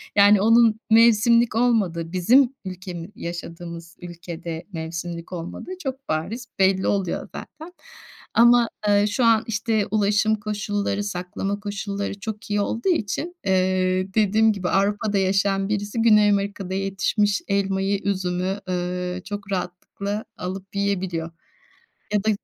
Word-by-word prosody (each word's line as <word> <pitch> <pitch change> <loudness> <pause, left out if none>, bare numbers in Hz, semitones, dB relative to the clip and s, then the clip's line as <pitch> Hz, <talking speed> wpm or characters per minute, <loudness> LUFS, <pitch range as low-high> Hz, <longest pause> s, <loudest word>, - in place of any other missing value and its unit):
Yani, 205 0 +6
onun 225 0 +5
mevsimlik 230 +1 +5
olmadığı, 200 -9 +1
bizim 240 +9 +4
ülkemi 180 -2 -7
yaşadığımız 170 -1 -7
ülkede 170 -1 -7
mevsimlik 170 +1 -5
olmadığı 175 - -6
çok 270 -1 -5
bariz 210 +11 -2
belli 190 0 +3
oluyor 195 -4 0
zaten. 320 +4 -9 0.6
Ama, 240 0 +5 0.2
eee, 205 0 +4
şu 210 +4 0
an, 225 -1 +4
işte, 220 -1 0
ulaşım 210 +1 +2
koşulları, 205 -1 -2
saklama 195 +1 -3
koşulları 200 -1 -4
çok 215 0 -6
iyi 205 0 +2
olduğu 230 - -1
için, 335 - -1
eee, 185 0 +1
dediğim 220 +1 +4
gibi 185 -3 -3
Avrupa'da 205 +1 +1
yaşayan 195 0 +1
birisi 210 +2 -2
Güney 210 -2 +5
Amerika'da 200 -2 -1
yetişmiş 195 +1 0
elmayı, 195 0 0
üzümü, 185 0 -1
ööö, 180 0 -3
çok 205 -1 -7
rahatlıkla 195 +3 -4
alıp 190 +2 -6
yiyebiliyor. 185 -5 -1 0.8
Ya 205 -1 +1
da 220 - +3
200 Hz, 125 wpm, -23 LUFS, 185-215 Hz, 0.8 s, Yani